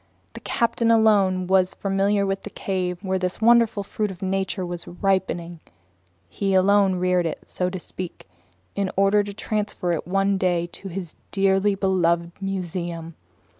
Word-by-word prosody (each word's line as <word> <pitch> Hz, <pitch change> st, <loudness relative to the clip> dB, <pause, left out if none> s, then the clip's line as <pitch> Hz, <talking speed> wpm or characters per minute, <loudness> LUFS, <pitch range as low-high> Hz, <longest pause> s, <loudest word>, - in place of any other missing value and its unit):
The -, -, -8 dB
captain 235 Hz, 0 st, 0 dB
alone 205 Hz, -5 st, +4 dB
was 185 Hz, 0 st, +2 dB
familiar 200 Hz, +1 st, +1 dB
with 195 Hz, 0 st, -2 dB
the -, -, -8 dB
cave 185 Hz, -3 st, -2 dB
where 190 Hz, -1 st, 0 dB
this 180 Hz, 0 st, -2 dB
wonderful 230 Hz, -2 st, +4 dB
fruit 210 Hz, +1 st, -2 dB
of 190 Hz, 0 st, -8 dB
nature 190 Hz, 0 st, -1 dB
was 175 Hz, -1 st, -5 dB
"ripening"; 175 Hz, -2 st, -1 dB, 0.7 s
he 195 Hz, -, -1 dB
alone 195 Hz, 0 st, +4 dB
reared 180 Hz, -1 st, +1 dB
it, 160 Hz, -, -6 dB
so 180 Hz, 0 st, -1 dB
to 185 Hz, 0 st, -5 dB
speak, 180 Hz, 0 st, -8 dB, 0.5 s
in 200 Hz, -1 st, -1 dB
order 200 Hz, +1 st, +4 dB
to 205 Hz, -, -6 dB
transfer 210 Hz, -5 st, -2 dB
it 165 Hz, -1 st, -2 dB
one 195 Hz, +1 st, +1 dB
day 175 Hz, -2 st, +1 dB
to 195 Hz, -, -7 dB
his 180 Hz, -2 st, -6 dB, 0.2 s
dearly 195 Hz, +1 st, +2 dB
beloved 170 Hz, -3 st, +1 dB
museum. 175 Hz, -3 st, -4 dB
190 Hz, 155 wpm, -23 LUFS, 180-200 Hz, 0.7 s, alone